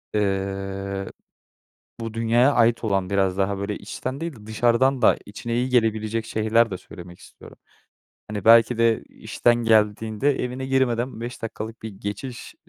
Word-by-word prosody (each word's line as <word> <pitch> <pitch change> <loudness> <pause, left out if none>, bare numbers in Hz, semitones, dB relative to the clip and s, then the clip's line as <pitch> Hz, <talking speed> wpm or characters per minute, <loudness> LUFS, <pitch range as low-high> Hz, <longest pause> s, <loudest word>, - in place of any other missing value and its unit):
ııı, 95 -1 -2 0.9
bu 115 -1 -5
dünyaya 115 +4 +3
ait 120 -2 +3
olan, 95 -2 0
biraz 95 -2 +1
daha, 100 0 0
böyle, 100 +1 -3
içten 130 +6 -6
değil 165 -5 -5
de 105 -1 -14
dışarıdan 120 +4 +2
da - - +5
içine 115 +3 -5
iyi 125 +2 0
gelebilecek 110 -2 0
şeyler 110 +1 +2
de 95 - -4
söylemek 90 0 -12
istiyorum. - - -15 0.7
Hani, 105 -2 -5
belki 115 +1 +6
de 115 -1 +2
işten 120 0 0
geldiğinde 110 +3 +2
evine 125 +1 -4
girmeden 125 -3 0
5 120 +1 -6
dakikalık 115 0 -6
bir 110 - -5
geçiş 105 +5 -7
110 Hz, 145 wpm, -23 LUFS, 100-120 Hz, 0.9 s, belki